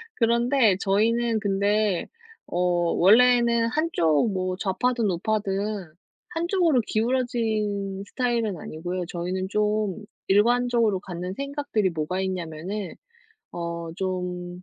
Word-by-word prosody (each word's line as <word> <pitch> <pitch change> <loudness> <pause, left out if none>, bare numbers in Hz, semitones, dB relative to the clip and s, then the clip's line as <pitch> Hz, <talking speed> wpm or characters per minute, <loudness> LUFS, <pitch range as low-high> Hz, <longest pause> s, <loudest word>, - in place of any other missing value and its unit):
그런데 235 -2 +3
저희는 225 +3 +2
근데 205 -1 +1 0.4
어 175 - -4 0.3
원래는 235 +3 +5
한쪽 230 - +1
뭐 185 -1 -2
좌파든 225 +3 0
우파든 200 -1 -2 0.4
한쪽으로 340 -5 +2
기울어진 220 -5 -1
스타일은 235 -6 -1
아니고요. 175 +4 -5
저희는 180 +2 -3
좀 210 -2 0 0.3
일관적으로 230 0 +3
갖는 180 -1 -6
생각들이 275 -6 -1
뭐가 165 +3 -2
있냐면은 185 +2 -4 0.6
어 170 -1 -4
좀 180 -1 -4
205 Hz, 245 characters per minute, -25 LUFS, 185-235 Hz, 0.6 s, 원래는